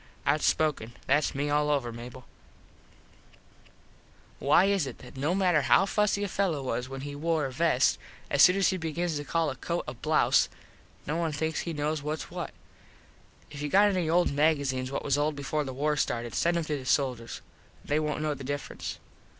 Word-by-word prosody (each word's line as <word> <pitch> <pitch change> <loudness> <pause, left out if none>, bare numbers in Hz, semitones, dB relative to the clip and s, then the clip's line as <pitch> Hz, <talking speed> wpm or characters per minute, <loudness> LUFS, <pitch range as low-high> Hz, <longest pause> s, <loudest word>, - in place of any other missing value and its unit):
Outspoken. 150 -5 +1
Thats 145 +2 +2
me 145 +1 -1
all 150 0 +2
over, 135 -5 0
Mable. 120 +2 -10 2.1
Why 150 +6 +4
is 195 -7 +1
it 130 - -7
that 125 - -13
no 145 +7 0
matter 180 -5 +3
how 125 +8 +4
fussy 205 0 +1
a - - 0
fello 180 -7 -1
was 125 0 -3
when 135 0 -6
he 145 +1 -6
wore 155 +1 0
a 135 - -4
vest 145 -2 +2 0.3
as 140 - +2
soon 180 - +8
as 195 -1 +3
he 190 - -1
begins 165 -1 -2
to 145 - -4
call 160 0 0
a - - -6
coat 170 +4 -3
a 120 - -4
blouze 155 +6 +2 0.6
no 155 +3 -2
one 165 -2 0
thinks 160 +2 -2
he 170 - -3
knows 150 0 -1
whats 150 +2 -4
what. - - -4 1.0
If 145 -1 -8
you 150 - -2
got 205 +5 +5
any 180 -5 0
old 175 +2 +3
magazenes 140 -3 +1
what 140 - -3
was 145 0 +1
old 150 +1 0
before 145 +2 -2
the 135 - -5
war 150 +3 0
started 120 -4 -2
send 170 0 +1
em 170 - 0
to 150 -1 -2
the 130 - -10
soldiers. 125 -4 0 0.4
They 150 +1 +1
wont 150 0 -2
know 155 -1 0
the 140 -1 -8
difference. 145 +2 -5
150 Hz, 195 wpm, -28 LUFS, 135-165 Hz, 2.1 s, soon